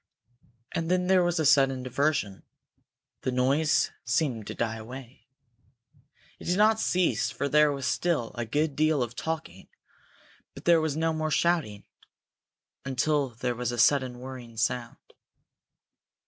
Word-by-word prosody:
And 165 0 -2
then 180 0 +2
there 185 0 +4
was 175 -1 0
a 155 - +1
sudden 135 -2 +4
diversion. 130 -6 -1 0.8
The 130 - -1
noise 135 +5 +2
seemed 125 - -1
to - - -6
die 115 -1 -2
away. 125 +3 -11 1.1
It - - -11
did 180 +2 0
not 215 +1 +4
cease 180 -4 +1
for 140 - -3
there 150 +1 +4
was 140 -2 -4
still 145 -4 0
a 120 - -3
good 145 +5 -1
deal 155 -3 +2
of 120 0 -7
talking, 155 - -5 0.9
but - - -11
there 170 -1 +5
was 155 -2 -1
no 160 0 +1
more 155 0 -2
shouting, 155 -12 0 1.0
until 140 +1 0
there 120 +1 -3
was 120 0 -3
a 120 - -4
sudden 130 0 +3
whirring 125 -3 -9
sound. 120 +1 -1
140 Hz, 145 wpm, -27 LUFS, 120-160 Hz, 1.1 s, there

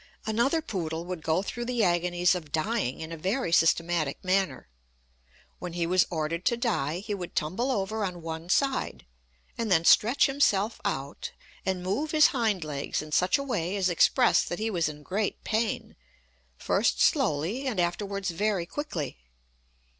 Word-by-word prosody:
Another 240 +9 +1
poodle 165 - -4
would 180 -2 -5
go 160 +4 +1
through 240 +4 -4
the 240 -2 0
agonies 175 0 +2
of 165 -5 -5
dying 160 - -1
in 160 +1 -6
a 165 - -5
very 190 +4 -1
systematic 165 -2 +2
manner. 185 - 0 0.9
When 180 -2 -6
he 170 -1 -1
was 180 +2 +3
ordered 165 +1 -2
to 235 - +2
die, 180 - -1
he 210 0 -4
would 180 -3 -6
tumble 185 - -1
over 215 -2 -1
on 180 -3 -4
one 165 +1 -6
side, 270 +6 0 0.5
and 225 -3 -1
then 165 -2 +4
stretch 235 +10 +5
himself 225 -6 +1
out, 135 +2 -4 0.3
and 185 -1 -1
move 235 +12 -1
his 305 -1 +6
hind 220 - 0
legs 145 0 -3
in 155 - -11
such 180 - +3
a 280 - -3
way 200 -9 -2
as 190 -2 +1
expressed 240 +8 +3
that 175 - -3
he 220 +1 -2
was 170 -5 +1
in 150 0 -10
great 200 +5 -2
pain, 220 0 -1 0.6
first - - +1
slowly 175 - +1
and 225 -8 -1
afterwards 195 +2 -1
very 195 0 0
quickly. 170 - -5
185 Hz, 165 wpm, -28 LUFS, 165-220 Hz, 0.9 s, his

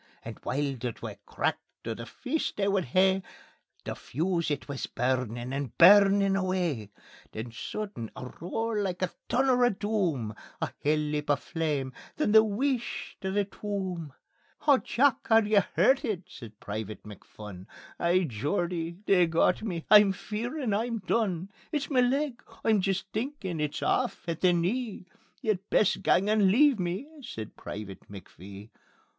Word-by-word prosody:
And - - -7
while 140 0 -1
the 120 0 -3
twa - - -7
cracked - - -3
o' 115 - -1
the 115 +1 -8
feast 290 +4 -3
they 200 -1 +1
would 195 -2 +1
hae, 190 +7 +3 0.6
The - - -3
fuse 170 +4 -1
it 145 -2 -3
wis 140 -2 -4
burnin' 125 -1 -1
and 140 -3 -4
burnin' 195 +2 +7
away. 180 - -1 0.4
Then 115 +2 -5
sudden 125 - -5
a 125 - -8
roar 225 +6 -2
like 185 -3 -2
the 185 -1 -1 0.2
thunner 255 0 +3
o' 245 - +6
doom, 190 - -1 0.3
A - - -2
hell 150 +1 +3
leap 150 0 -2
o' 145 - +5
flame... 145 -3 -2 0.2
then 300 -9 +1
the 220 0 +8
wheesht 240 +3 -2
o' 190 - -1
the 200 +1 +1
tomb. 190 -6 -4 0.5
"Haw, 285 -3 +5
Jock! 265 +1 +1
Are 225 0 +6
ye 210 0 +4 0.2
hurtit?" 235 - +3
says 120 -11 -10
Private 105 0 -6
McPhun. 105 -2 -11 0.3
"Ay, 175 +2 +3
Geordie, 165 - -2
they've 180 -3 +4
got 170 +2 +2
me; 180 -7 -4
I'm 205 -2 +8
fearin' 235 +5 -3
I'm 230 +3 0
done. 195 -3 -1 0.2
It's 295 -2 -2
ma 260 - +3
leg; 260 +1 +1 0.2
I'm 220 -3 +4
jist 195 0 0
thinkin' 215 - -3
it's 150 -1 -2
aff - - 0
at 165 -1 -3
the 185 - +5
knee; 195 +5 -1 0.4
Ye'd 210 -3 -1
best 210 - +3
gang 195 +3 +3
and 210 -2 +4
leave 275 +1 +5
me," 180 +9 -2
says 110 - -7
Private 100 -2 -8
McPhee. 100 +1 -11
185 Hz, 155 wpm, -28 LUFS, 145-215 Hz, 0.6 s, the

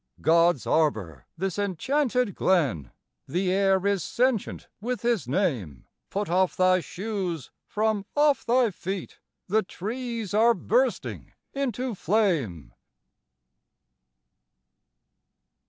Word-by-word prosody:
God's 165 -2 +3
arbor, 105 - 0
this 190 +2 -2
enchanted 250 - 0
Glen! 135 - +1 0.4
The 180 +6 0
air 195 0 +2
is 200 -4 +1
sentient 250 -3 -1
with 245 +2 -3
His 235 - +1
name; 125 - -1 0.2
Put 205 +1 -2
off 185 +2 +1
thy 185 0 +4
shoes 185 - -4 0.2
from 210 -2 -1
off 290 -1 +3
thy 240 -1 +3
feet, 190 +1 -6 0.3
The 215 +3 +2
trees 225 +1 -5
are 230 +2 +5
bursting - - -1 0.2
into 260 -2 -2
flame! 155 - 0
195 Hz, 100 wpm, -26 LUFS, 170-230 Hz, 0.4 s, are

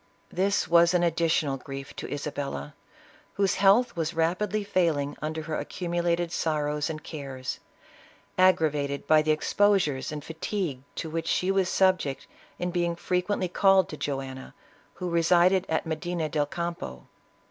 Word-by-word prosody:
This 195 +2 +1
was 170 +1 +5
an 175 - +3
additional 160 -4 +1
grief 135 +1 -8
to - - -6
Isabella, 145 0 -4 0.6
whose 195 -2 +2
health 200 +5 +4
was 165 0 -2
rapidly 185 +6 0
failing 160 -7 0
under 155 +1 -3
her 155 0 -3
accumulated 175 -1 -1
sorrows 150 -2 -1
and 155 -1 -5
cares, 135 -4 -6 0.8
aggravated 150 -6 +2
by 155 -1 +5
the 155 - -3
exposures 155 -3 +2
and 150 -1 -5
fatigue 160 -4 -3
to 160 - -5
which 165 0 -3
she 185 +1 +1
was 190 -2 +1
subject 185 -8 +1 0.3
in 180 0 -2
being 175 -1 0
frequently 180 +2 -1
called 190 0 +4
to - - -6
Joanna, 135 -2 -5 0.4
who 180 - -4
resided 175 +2 +3
at 160 - 0
Medina 160 0 -2
del 145 -1 0
Campo. 170 - -5
165 Hz, 140 wpm, -27 LUFS, 150-180 Hz, 0.8 s, was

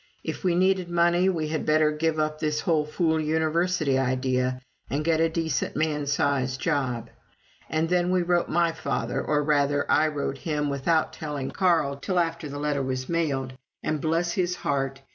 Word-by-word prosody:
If - - -5
we 180 -2 +2
needed 185 0 +2
money, 175 +2 +3
we 160 -4 -1
had 155 0 -2
better 155 0 +3
give 155 +1 0
up 155 0 -1
this 150 -1 -1
whole 155 -3 +1
fool 160 0 +1
University 160 -1 +1
idea 130 -1 0 0.3
and 150 +2 -2
get 165 -1 +2
a 165 - +3
decent 160 -3 -2
man 150 -1 -1
sized 135 -2 0
job. 130 -8 -1 0.6
And 160 +1 0
then 180 0 +1
we 185 -1 +2
wrote 175 0 +1
my 170 0 +2
father, 160 - -2
or, 150 -1 +1
rather, 145 -1 +2
I 155 +1 +4
wrote 140 -2 -3
him 150 -1 -1
without 155 +4 +1
telling 145 -4 -4
Carl 165 -7 +2
till 185 +6 -2
after 165 -3 -1
the 145 - -6
letter 145 -1 -1
was 130 -1 -3
mailed, 140 -6 -1 0.3
and 155 -2 -1
bless 165 +2 0
his 180 -1 0
heart! 135 -3 -2
155 Hz, 180 wpm, -26 LUFS, 140-170 Hz, 0.6 s, I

